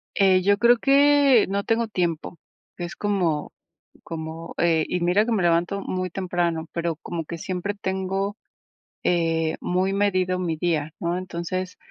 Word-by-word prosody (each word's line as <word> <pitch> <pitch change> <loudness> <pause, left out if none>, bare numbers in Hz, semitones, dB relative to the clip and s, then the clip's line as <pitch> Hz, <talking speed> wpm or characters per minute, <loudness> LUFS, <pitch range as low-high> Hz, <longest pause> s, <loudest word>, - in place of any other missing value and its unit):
Eh, 190 -2 +4
yo 200 +2 +3
creo 235 +1 +5
que, 280 -2 +5
no 200 +1 -1
tengo 230 +1 +1
tiempo, 175 -4 -2 0.4
es 175 -1 -5
como 180 -8 -1 0.5
como, 160 0 -7
eh, 165 -2 +2
y 180 - -1
mira 180 +5 +3
que 240 - 0
me 210 -4 +1
levanto 175 +3 +1
muy 185 -1 -2
temprano, 175 -3 -1
pero 170 -2 -2
como 165 0 -5
que 170 - -5
siempre 185 +4 -3
tengo, 195 +1 -2 0.7
eh, 165 -2 +1
muy 185 +2 0
medido 185 -2 +1
mi 170 -3 -2
día, 155 -2 -1
¿no?, 170 +1 -1
entonces, 185 0 -4
180 Hz, 150 wpm, -24 LUFS, 170-200 Hz, 0.7 s, creo